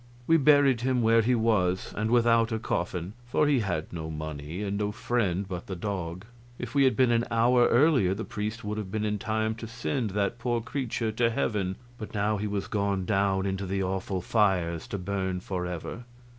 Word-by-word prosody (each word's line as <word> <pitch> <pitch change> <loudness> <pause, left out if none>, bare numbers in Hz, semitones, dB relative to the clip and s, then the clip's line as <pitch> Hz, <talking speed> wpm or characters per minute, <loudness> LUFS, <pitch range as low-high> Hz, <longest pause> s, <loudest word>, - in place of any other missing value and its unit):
We 165 +4 +5
buried 140 -4 +5
him 125 -1 +1
where 115 +1 +5
he 125 +3 +2
was, 100 -6 +1
and 110 +1 -1
without 115 -1 +4
a 110 - 0
coffin, 90 -3 -3
for 135 +5 +2
he 145 -3 +3
had 90 -8 -3
no 80 -2 -5
money, 80 +3 -5
and 100 0 -2
no 105 0 -1
friend 105 -4 -1
but 90 -2 -6
the 95 - -4
dog. 90 -1 -4 0.3
If 120 -1 -6
we 140 -1 +4
had 130 - +3
been 130 -2 +4
an 115 0 +2
hour 120 +1 +4
earlier 125 - +4
the 110 - -5
priest 105 +2 -4
would 105 +1 -3
have 100 -3 -5
been 110 +2 -2
in 105 -1 -1
time 110 +1 -1
to 115 0 -8
send 120 +1 -2
that 100 +4 -1
poor 120 -1 0
creature 120 -3 -2
to 115 +2 +2
heaven, 100 -4 -1 0.2
but 110 - -7
now 105 +1 +1
he 105 +1 -2
was 100 -1 -2
gone 100 -3 -1
down 95 -1 +1
into 95 0 -2
the 95 +1 -1
awful 95 0 -2
fires, 90 -6 +1
to 100 - -4
burn 95 -1 -2
forever. 90 +4 -5
105 Hz, 200 wpm, -28 LUFS, 95-115 Hz, 0.3 s, We